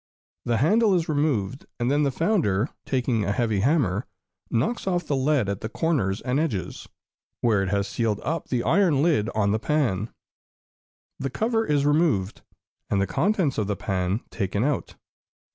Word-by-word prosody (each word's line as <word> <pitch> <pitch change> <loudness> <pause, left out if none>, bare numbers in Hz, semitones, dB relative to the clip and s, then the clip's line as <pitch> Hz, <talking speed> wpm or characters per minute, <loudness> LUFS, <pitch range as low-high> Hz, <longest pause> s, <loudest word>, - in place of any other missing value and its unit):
The 120 -1 +1
handle 205 - +3
is 170 -2 0
removed, 145 -6 -1
and 120 +2 +1
then 145 +1 +2
the 145 - +2
founder, 140 - +1 0.2
taking 125 -4 0
a 100 - 0
heavy 110 -3 0
hammer, 115 - +1 0.4
knocks 165 - -1
off 175 -3 0
the 145 - 0
lead 135 -4 +1
at 100 -1 -3
the 110 - -4
corners 115 - 0
and 130 +2 0
edges, 115 - -3 0.5
where 110 -5 +3
it 95 - -1
has 100 0 0
sealed 110 -2 -1
up 165 +1 -2
the 120 -2 0
iron 155 - +3
lid 145 -10 +2
on 100 -2 +2
the 110 - +1
pan. 115 -7 0 1.1
The 135 - -2
cover 225 - 0
is 145 -1 +2
removed, 145 - +1 0.5
and 100 - +1
the 100 - +2
contents 165 - 0
of 105 - -1
the 100 - -1
pan 95 +2 -1
taken 100 0 -1
out. 145 0 -1
130 Hz, 170 wpm, -25 LUFS, 105-155 Hz, 1.1 s, handle